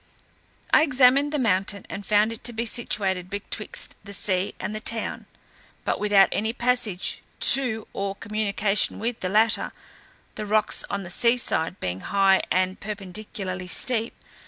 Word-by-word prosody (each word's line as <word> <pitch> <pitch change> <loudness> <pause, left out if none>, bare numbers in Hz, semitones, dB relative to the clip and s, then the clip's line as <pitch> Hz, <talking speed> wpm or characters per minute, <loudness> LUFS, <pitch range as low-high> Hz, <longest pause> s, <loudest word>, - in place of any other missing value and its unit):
I - - +7
examined 275 -1 +4
the 300 - -1
mountain, 200 -5 0
and 200 - -6
found 210 +2 +2
it 225 - -11
to 240 - 0
be 230 +1 -2
situated 195 -6 -1
betwixt 205 +2 -4
the 200 0 -9
sea 190 -1 0
and 210 - -4
the 215 - -4
town, 225 +1 -2 0.6
but - - -1
without 205 -2 +5
any 220 +2 -1
passage 240 -6 -1 0.2
to 245 -5 +5
or 195 0 -3
communication 210 -1 -1
with 230 +1 -3
the 185 - -3
latter; 215 +3 +2 0.6
the 215 -1 -6
rocks 215 0 +1
on 200 -1 -3
the 175 - -8
sea 235 +6 +3
side 180 -6 -2
being 90 0 -3
high 195 - +3
and 185 +1 0
perpendicularly 195 -2 -6
steep. 230 +4 0
210 Hz, 155 wpm, -24 LUFS, 195-230 Hz, 0.6 s, I